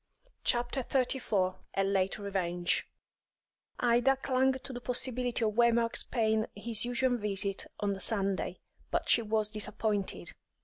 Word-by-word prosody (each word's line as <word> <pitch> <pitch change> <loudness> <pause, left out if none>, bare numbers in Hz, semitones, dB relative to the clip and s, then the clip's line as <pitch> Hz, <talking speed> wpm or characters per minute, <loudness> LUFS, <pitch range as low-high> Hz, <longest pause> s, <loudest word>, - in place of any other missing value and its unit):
CHAPTER 240 +2 +1
XXXIV 230 -8 0 0.2
A 195 - +2
LATE 195 -1 +1
REVENGE 180 -4 -1 0.9
Ida 245 +3 +4
clung 265 0 +2
to 260 0 -7
the 245 - -6
possibility 245 -1 0
of 215 - 0
Waymark's 235 0 +3
paying 220 -2 +1
his 220 +2 0
usual 245 +1 +1
visit 200 -2 -1
on 205 -1 0
the 195 - -7
Sunday, 195 -2 0 0.3
but - - -1
she 235 - +6
was 215 -1 0
disappointed. 205 - -2
220 Hz, 130 wpm, -31 LUFS, 200-245 Hz, 0.9 s, she